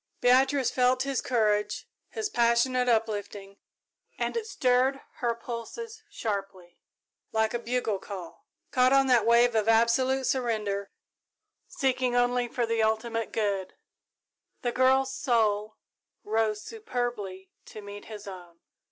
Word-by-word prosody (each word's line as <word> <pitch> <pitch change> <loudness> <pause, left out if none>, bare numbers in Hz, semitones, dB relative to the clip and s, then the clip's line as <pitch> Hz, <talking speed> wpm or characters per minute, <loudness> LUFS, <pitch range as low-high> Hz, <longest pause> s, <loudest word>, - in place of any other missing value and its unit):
Beatrice 265 +2 +3
felt 255 0 +2
his 275 -1 -1
courage, 210 -3 0 0.2
his 435 -1 -3
passionate 245 - +2
uplifting, 205 -3 -2 0.6
and - - -2
it 455 -2 -2
stirred 260 - +2 0.2
her 235 -1 0
pulses 345 - -7
sharply, 195 - -5 0.5
like 220 0 +1
a 240 - -1
bugle 235 -4 -1
call. 190 -4 -9 0.2
Caught 255 +1 +4
on 275 0 +5
that 245 -4 +3
wave 235 +1 +5
of 220 -1 +1
absolute 255 +4 +3
surrender, 215 -6 -1 0.8
seeking 255 -2 0
only 245 0 +2
for 240 0 -1
the 230 0 0
ultimate 220 +1 -1
good, 200 -4 -2 0.9
the 240 - 0
girl's 265 +1 +3
soul 215 -5 0 0.5
rose 215 0 0
superbly 240 - -5
to 215 - -10
meet 205 0 -9
his 210 -2 -9
own. 175 -3 -10
235 Hz, 125 wpm, -28 LUFS, 210-255 Hz, 0.9 s, on